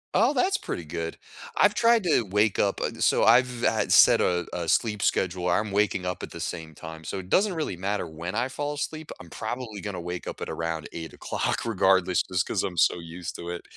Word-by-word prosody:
Oh, 235 +5 +4
that's 385 +9 +2
pretty 85 - -5
good. 80 +1 -5 0.4
I've 205 - +5
tried 230 -1 +4
to 165 -8 +3
wake 105 0 +1
up 100 - +1
uh, - - 0
so - - +3
I've 120 +1 +4
had 110 -2 +1
set - - +7
a 90 -1 +1
a 85 -2 -3
sleep 105 +3 +1
schedule, 90 -1 0
I'm 105 -1 +1
waking 100 -2 +1
up 90 0 -3
at - - -6
the - - -9
same 80 -2 -5
time, 80 +1 -9
so 95 - -4
it 95 0 -7
doesn't 195 -2 +3
really 155 - -2
matter 95 +1 -2
when 85 +5 -6
I 120 +2 +1
fall 145 +2 -3
asleep, 155 +1 -5
I'm 85 - -13
probably 110 -2 -5
gonna 100 -4 -5
wake 90 +1 -5
up - - -6
at - - -5
around 80 -1 -3
08:00 80 +6 -3
regardless 95 -4 +3
just 90 -2 -1
'cause - - -1
I'm 90 -3 -4
so 85 - +3
used 85 +1 -7
to 85 0 -7
it. 85 - -5
95 Hz, 220 wpm, -26 LUFS, 85-120 Hz, 0.4 s, set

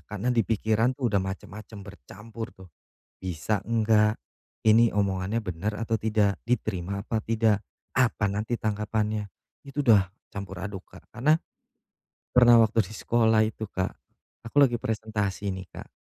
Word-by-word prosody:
karena 105 +4 -1
di 120 - +3
pikiran 110 +4 +1
tuh 120 -6 -1
udah 100 - +3
macem-macem 100 +2 -7
bercampur, 105 - -9
tuh, 95 -1 -14 0.5
"Bisa 95 +3 -2
nggak? 110 -1 +2 0.4
Ini 115 +1 +5
omongannya 100 +2 0
benar 95 +1 -3
atau 115 0 0
tidak? 105 -2 +1
Diterima 100 -5 -1
apa 110 +2 -2
tidak? 110 -2 +1 0.3
apa 120 -4 +2
nanti 105 +4 -2
tanggapannya?" 105 0 -1 0.4
itu 145 +2 -3
udah 100 -6 +5 0.2
campur 95 -2 -6
aduk, 95 -2 -6
Kak, - - -17
karena 150 +6 +3 1.0
pernah 120 -2 +7
waktu 110 -1 +3
di 105 - -11
sekolah 110 -1 +3
itu, 110 0 -6
Kak, 95 -1 -2 0.5
aku 115 - -10
lagi 120 -4 +4
presentasi, 105 -3 -2
nih, 95 0 -7
Kak, - - -9
110 Hz, 140 wpm, -27 LUFS, 100-115 Hz, 1.0 s, pernah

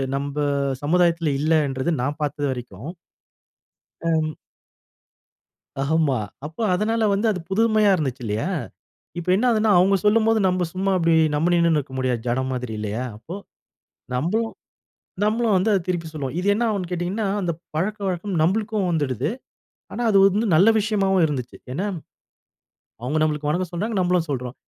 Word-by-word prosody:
நம்ப 140 +1 -4 0.5
சமுதாயத்தில 170 -1 +2
இல்லைன்றது 150 -1 +1
நான் 145 +3 -2
பார்த்த 145 -1 -1
வரைக்கும். 120 - -7 1.1
அம். 160 -2 0 1.5
ஆமா. 145 -2 +2 0.3
அப்ப 160 +1 -13 0.2
அதனால 225 +4 +1
வந்து 200 +3 +1
அது 190 -4 -2
புதுமையா 215 0 +3
இருந்துச்சு 135 -5 -3
இல்லையா, 110 - -1 0.7
இப்ப 175 +1 -6
என்ன 220 - 0
ஆகுதுனா 220 -1 +2
அவங்க 195 +2 +4
சொல்லும்போது 225 +1 +4
நம்ப 180 0 0
சும்மா 190 +1 -1
அப்படி 165 -1 +3 0.2
நம்ப 155 +4 +1
நின்னுனே 170 -2 +3
இருக்க 140 -2 -5
முடியாது, 125 -2 0
ஜடம் 130 +2 0
மாதிரி 125 -2 -4
இல்லையா, 105 +3 -3
அப்போ 155 +11 -9 0.8
நம்மளும் 210 - 0 0.7
நம்மளும் 220 0 +2
வந்து 190 +4 +1
அதை 195 - +2
திருப்பி 175 -3 -2
சொல்லுவோம். 145 -3 -5
இது 185 - -2
என்ன 220 +4 0
ஆவுன்னு 195 -5 -2
கேட்டீங்கனா, 180 +5 -2 0.2
அந்த 175 -3 0 0.2
பழக்கவழக்கம் 190 +1 -2
நம்பளுக்கும் 205 +3 +1
வந்துடுது, 135 -6 -1 0.6
ஆனா, 245 - -3
அது 200 - +5
வந்து 205 +3 +3
நல்ல 185 +7 +6
விஷயமாவும் 195 -3 +2
இருந்துச்சு. 130 -5 -4 0.2
ஏன்னா, 185 +10 -2 1.2
அவங்க 140 +6 -1
நம்மளுக்கு 150 -1 0
வணக்கம் 175 +3 -1
சொன்னாங்க, 210 +6 -2
நம்மளும் 180 -2 +1
சொல்றோம். 125 -3 -3
170 Hz, 140 wpm, -23 LUFS, 145-200 Hz, 1.5 s, நல்ல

